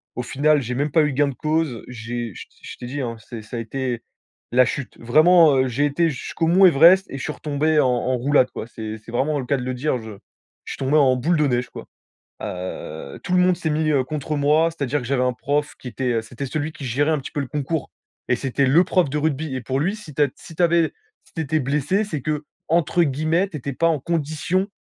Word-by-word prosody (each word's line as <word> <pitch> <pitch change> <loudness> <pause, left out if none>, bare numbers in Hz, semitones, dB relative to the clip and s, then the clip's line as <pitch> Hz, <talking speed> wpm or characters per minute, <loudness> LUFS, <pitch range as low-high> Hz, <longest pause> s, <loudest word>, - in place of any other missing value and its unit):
Au 125 - -3
final, 145 +4 +2
j'ai 125 0 -4
même 145 +3 -1
pas 155 +2 +4
eu 150 - 0
gain 145 +2 +2
de - - -5
cause. 155 -5 -1
J'ai 120 -2 -5
je - - -8
t - - -31
je - - -9
t'ai - - -8
dit, 140 +3 -4
hein, 115 -2 -3
c'est 110 +1 -9
ça 110 +3 -9
a - - -2
été 120 +1 -3 0.5
la 125 +1 +5
chute. 130 +2 -5
Vraiment, 155 +5 +5
heu, 130 0 +3
j'ai 135 +5 +1
été 165 +3 +1
jusqu'au 155 +4 -3
mont 185 +3 +6
Everest 175 +4 +7
et 135 - -6
je 135 - -6
suis 155 - -2
retombé 150 +1 0
en 135 - +4
en 125 +1 0
roulade 130 +1 +3
quoi. - - -6
C'est 110 -1 -6
c'est 110 +1 -13
vraiment 145 +4 0
le 130 - -4
cas 140 - +1
de 125 - -4
le 130 +1 -2
dire. 130 +2 -1
Je 110 -1 -9 0.5
je - - -6
suis - - -9
tombé 135 +2 0
en 130 -4 +5
boule 160 +7 +1
de 150 - +3
neige, 125 -1 -1
quoi. - - -10 0.6
Heu, 85 -5 -6
tout - - -3
le 180 - +4
monde 180 -1 +4
s'est 160 -2 -2
mis, 155 0 +1
heu, 135 -3 +2
contre 150 +2 -3
moi. 150 +3 +3
C'est-à-dire 145 -3 -2
que 125 - -7
j'avais 130 -1 +1
un 125 0 +2
prof 145 +4 -2
qui 130 - -8
était 125 -2 -1
c'était 125 +4 -7
celui 155 +3 -3
qui 140 - -9
gérait 140 +5 +1
un 155 - +1
petit 135 - -7
peu 145 - -3
le 140 - -3
concours 145 +3 -3 0.4
et 125 - +3
c'était 135 +1 0
le 160 +8 +5
prof 180 -3 +2
de 140 - -3
rugby. 150 -1 -1
Et - - -3
pour 130 +3 -1
lui, 190 +8 0
si 185 -9 -11
tu 150 - +2
as 145 - +4
si 165 - -13
tu 180 - 0
avais 170 -1 +3 0.3
si - - -24
tu 165 - -3
étais 155 +1 0
blessé, 150 +9 0
c'est 160 -8 -4
que 150 +2 -2 0.2
entre 170 +1 +2
guillemets, 155 +6 +1
tu 170 - -7
étais 140 0 -4
pas 165 +6 +1
en 160 -4 0
«condition», 165 +4 -1
145 Hz, 260 wpm, -22 LUFS, 125-155 Hz, 0.6 s, Everest